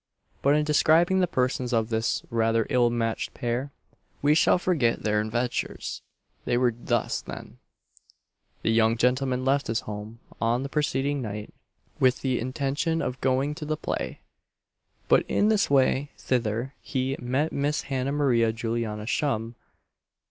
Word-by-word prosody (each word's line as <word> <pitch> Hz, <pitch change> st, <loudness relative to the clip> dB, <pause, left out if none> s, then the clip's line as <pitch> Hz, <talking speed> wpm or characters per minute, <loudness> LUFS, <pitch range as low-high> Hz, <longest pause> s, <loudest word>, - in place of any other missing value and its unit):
But 140 Hz, +1 st, +4 dB
in 150 Hz, -, +2 dB
describing 165 Hz, +5 st, +4 dB
the 180 Hz, -, +3 dB
persons 125 Hz, -3 st, -1 dB
of 110 Hz, -1 st, +1 dB
this 115 Hz, 0 st, 0 dB
rather 115 Hz, -1 st, +2 dB
ill 120 Hz, -1 st, +4 dB
matched 115 Hz, -1 st, -2 dB
pair, 125 Hz, +4 st, -2 dB, 0.5 s
we 145 Hz, +1 st, +5 dB
shall 160 Hz, -, +4 dB
forget 155 Hz, -11 st, +1 dB
their 105 Hz, -1 st, +2 dB
adventures. 120 Hz, +3 st, -3 dB, 0.4 s
They 120 Hz, -, +1 dB
were 125 Hz, -1 st, +2 dB
thus 120 Hz, -1 st, -1 dB
then: -, -, -9 dB, 1.0 s
The -, -, +2 dB
young 115 Hz, 0 st, +3 dB
gentleman 130 Hz, +1 st, +1 dB
left 140 Hz, +1 st, +2 dB
his 115 Hz, 0 st, 0 dB
home 105 Hz, +2 st, -7 dB, 0.2 s
on 120 Hz, +3 st, +1 dB
the 140 Hz, -, -4 dB
preceding 145 Hz, -1 st, 0 dB
night 105 Hz, -2 st, -6 dB, 0.5 s
with 130 Hz, 0 st, +3 dB
the 130 Hz, -2 st, 0 dB
intention 140 Hz, +6 st, -1 dB
of 125 Hz, -, -4 dB
going 135 Hz, +3 st, +1 dB
to 150 Hz, -, -7 dB
the 155 Hz, 0 st, -1 dB
play, -, -, -4 dB, 0.9 s
but -, -, +5 dB
in 210 Hz, +2 st, +2 dB
his 210 Hz, -2 st, +2 dB
way 140 Hz, +1 st, +3 dB
thither 120 Hz, +1 st, -1 dB
he 130 Hz, 0 st, -2 dB
met 135 Hz, +5 st, 0 dB
Miss 145 Hz, +3 st, 0 dB
Hannah 135 Hz, 0 st, -2 dB
Maria 125 Hz, -6 st, +2 dB
Juliana 110 Hz, -1 st, -3 dB
Shum. 115 Hz, -3 st, -1 dB
125 Hz, 150 wpm, -26 LUFS, 115-140 Hz, 1.0 s, we